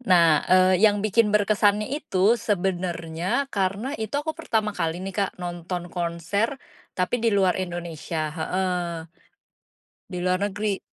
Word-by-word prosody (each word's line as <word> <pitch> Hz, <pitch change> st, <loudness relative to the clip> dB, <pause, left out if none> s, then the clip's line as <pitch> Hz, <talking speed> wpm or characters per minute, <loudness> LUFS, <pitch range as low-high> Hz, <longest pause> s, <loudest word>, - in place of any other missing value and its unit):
Nah, 170 Hz, -9 st, +5 dB
eee, 185 Hz, 0 st, +5 dB
yang 205 Hz, -1 st, +4 dB
bikin 215 Hz, +1 st, +3 dB
berkesannya 210 Hz, 0 st, +3 dB
itu, 225 Hz, -6 st, +2 dB
sebenernya, 180 Hz, +2 st, -1 dB
karena, 200 Hz, +6 st, -1 dB
itu 220 Hz, +3 st, -4 dB
aku 305 Hz, +2 st, -1 dB
pertama 220 Hz, -10 st, -1 dB
kali 165 Hz, -4 st, -2 dB
nih, 195 Hz, -, -4 dB
Kak, 200 Hz, -1 st, +1 dB
nonton 175 Hz, 0 st, -5 dB
konser 175 Hz, -, -1 dB, 0.4 s
tapi 185 Hz, +6 st, +1 dB
di 230 Hz, -, +2 dB
luar 190 Hz, -3 st, +3 dB
Indonesia, 170 Hz, -3 st, -4 dB
heeh. 180 Hz, +1 st, -1 dB, 1.2 s
Di 180 Hz, -, -3 dB
luar 185 Hz, 0 st, +2 dB
negeri. 205 Hz, 0 st, -2 dB
190 Hz, 130 wpm, -25 LUFS, 175-210 Hz, 1.2 s, Nah